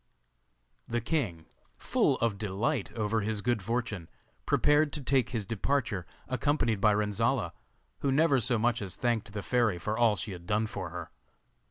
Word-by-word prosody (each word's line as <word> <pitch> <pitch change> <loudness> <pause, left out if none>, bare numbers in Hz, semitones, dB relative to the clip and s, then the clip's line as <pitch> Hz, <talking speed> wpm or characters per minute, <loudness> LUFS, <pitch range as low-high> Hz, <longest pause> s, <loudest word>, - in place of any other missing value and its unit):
The 120 - 0
king, 115 - -2 0.3
full - - +2
of 110 -4 +1
delight 110 +4 -1
over 110 0 0
his 105 -1 -2
good 120 -3 +1
fortune, 110 -4 -2 0.4
prepared 150 0 +4
to 150 - -2
take 130 -2 +2
his 110 -5 -2
departure, 110 -3 -1 0.2
accompanied 130 -5 +1
by 105 -1 +5
Renzolla, 105 -1 0 0.5
who 140 - +1
never 140 -1 +4
so 120 +1 +1
much 120 +1 +1
as 95 -3 -4
thanked 115 -3 -1
the 105 -1 -5
fairy 120 -7 +2
for 105 +5 -2
all 115 -2 +4
she 105 +1 -4
had 90 -2 -9
done 110 +1 +2
for 110 - -5
her. - - -7
110 Hz, 165 wpm, -30 LUFS, 105-125 Hz, 0.5 s, by